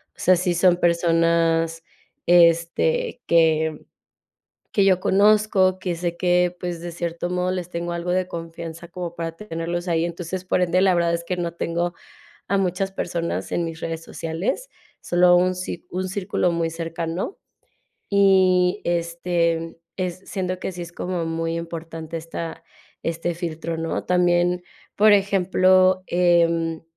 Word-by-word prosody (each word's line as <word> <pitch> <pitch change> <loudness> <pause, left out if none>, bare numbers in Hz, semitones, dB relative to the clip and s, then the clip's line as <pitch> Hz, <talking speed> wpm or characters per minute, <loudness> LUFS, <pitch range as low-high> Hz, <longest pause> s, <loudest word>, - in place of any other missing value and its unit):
sea, 185 +1 +4
sí 180 0 0
son 175 0 +4
personas, 165 -1 +2 0.4
este, 175 - +3
que 160 -2 +2 0.9
que 200 - +3
yo 190 -2 +4
conozco. 200 -2 +3
Que 180 -2 -2
sé 170 0 -3
que, 180 0 +2
pues, 175 -2 -4
de 175 - -5
cierto 170 +1 -4
modo, 180 0 0
les 180 -1 -4
tengo 170 0 -3
algo 170 +1 -3
de 185 0 0
confianza 165 0 -7
como 175 -1 -6
para 165 -1 -4
tenerlos 175 -1 -4
ahí. 165 0 +1
Entonces, 175 +2 -5
por 185 - +1
ende, 180 +1 +2
la 190 -1 +5
verdad 170 -1 +2
es 170 0 -3
que 180 +1 -3
no 170 -1 -3
tengo 170 +1 -2 0.5
a 200 - +2
muchas 190 +1 -1
personas 170 -3 -3
en 175 - 0
mis 165 0 -6
redes 165 0 -4
sociales. 165 - -3 0.3
Solo 175 0 +4
un 185 +1 +2
ci 180 -1 -6
un 185 +1 -3
círculo 185 -2 0
muy 165 -1 0
cercano. 165 - -4 0.7
Y, 190 -2 +4
este, 170 -1 -1 0.2
es 180 -2 -3
siento 185 -2 -3
que 190 - -4
sí 175 - -7
es 170 0 -7
como 175 -1 -3
muy 165 0 -2
importante 165 -1 -6
esta 165 0 -6 0.4
este 165 +1 -2
filtro, 165 -1 -4
¿no? 165 0 -2
También, 175 0 +2 0.4
por 210 0 +6
ejemplo, 185 -1 +3
em, 170 -2 +2
175 Hz, 145 wpm, -23 LUFS, 165-185 Hz, 0.9 s, por